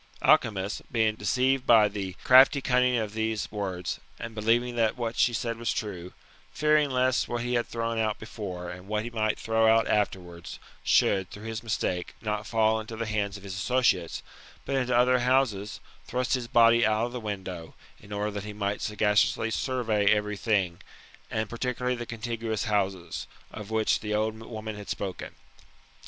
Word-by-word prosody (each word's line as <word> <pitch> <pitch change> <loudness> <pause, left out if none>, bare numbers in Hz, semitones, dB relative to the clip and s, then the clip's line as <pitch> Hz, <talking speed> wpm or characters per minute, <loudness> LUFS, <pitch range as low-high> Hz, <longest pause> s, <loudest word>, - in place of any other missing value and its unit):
Alcimus, 100 -2 +2
being 110 -2 +2
deceived 130 +5 +1
by 110 -3 +7
the 100 -3 -5
crafty 130 +2 +7
cunning 125 -1 +2
of 110 -2 -2
these 110 -1 -2
words, 95 -5 -3 0.2
and 115 -1 -6
believing 115 +3 +1
that 115 -1 +1
what 115 -1 -3
she 120 - +3
said 115 0 -3
was 115 -2 -1
true; 90 -4 -5 0.4
fearing 150 -1 +3
lest 130 0 +1
what 120 0 -3
he 125 0 -2
had 120 -1 +1
thrown 115 -1 -2
out 110 -1 0
before, 90 -5 -6
and 90 +1 -10
what 105 +1 -1
he 120 - -6
might 110 -2 0
throw 110 0 +2
out 115 0 +4
afterwards, 90 -5 -2 0.3
should, 95 -2 +3
through 105 - -10
his 110 0 -4
mistake, 95 -5 -2
not 105 -1 -3
fall 110 -1 +2
into 110 +1 -7
^e 115 - -2
hands 105 -2 -2
of 100 - -14
his 100 -2 -6
associates, 95 -5 +1 0.4
but 140 - -2
into 125 -2 +1
other 125 +1 +4
houses, 120 -4 +1 0.3
thrust 125 0 -1
his 125 -3 -1
body 115 0 +5
out 110 +1 +2
of 120 - -5
the 125 - -5
window, 95 -6 -6 0.2
in 100 - -16
order 105 +1 -2
that 100 -1 -5
he 105 0 -7
might 100 -1 -2
sagaciously 105 +1 +1
survey 110 -5 0
every 105 0 +1
thing, 100 -5 0 0.5
and 110 0 -2
particulariy 125 +1 -2
the 120 -1 -6
contiguous 115 -1 -3
houses, 95 -5 -2 0.2
of 105 -1 -8
which 110 -1 +1
the 105 - -6
c^d 110 +1 -1
woman 110 -2 -6
had 105 -1 -9
spoken. 95 -2 -5
110 Hz, 175 wpm, -27 LUFS, 105-120 Hz, 0.5 s, by